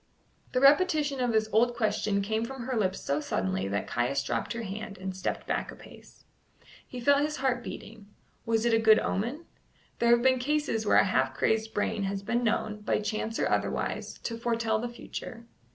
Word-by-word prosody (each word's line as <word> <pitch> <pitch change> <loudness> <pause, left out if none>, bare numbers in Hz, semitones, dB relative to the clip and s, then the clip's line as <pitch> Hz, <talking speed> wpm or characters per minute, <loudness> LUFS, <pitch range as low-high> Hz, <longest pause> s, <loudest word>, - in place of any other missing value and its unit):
The 255 - +2
repetition 290 0 +4
of 245 -1 +1
this 220 -1 +2
old 240 +2 +3
question 215 -3 0
came 220 +2 -1
from 260 +1 -6
her 255 +1 -3
lips 195 -4 0
so 140 +1 -1
suddenly 95 -7 -1
that 100 +1 -2
Caius 125 +3 0
dropped - - -2
her 235 0 -4
hand 205 0 -6
and 190 0 -5
stepped 185 - -3
back - - -2
a - - -11
pace. - - -16 0.6
He 250 - -7
felt 280 +3 +4
his 300 +1 -1
heart 255 -2 0
beating. 215 -3 -9 0.4
Was 225 0 0
it 235 - +3
a 225 - +5
good 220 -1 +6
omen? 240 - -2 0.5
There 235 - +3
have 240 0 +5
been 260 0 +4
cases 275 -5 0
where - - +5
a - - +6
half 130 -7 +1
crazed 220 +8 0
brain 205 0 0
has 195 0 -3
been 240 +4 0
known, 215 -2 0
by - - +1
chance 215 +2 -3
or - - +1
otherwise, - - -1
to 230 -1 -4
foretell 230 -2 0
the 240 +2 -3
future. 235 0 -8
225 Hz, 200 wpm, -29 LUFS, 205-245 Hz, 0.6 s, good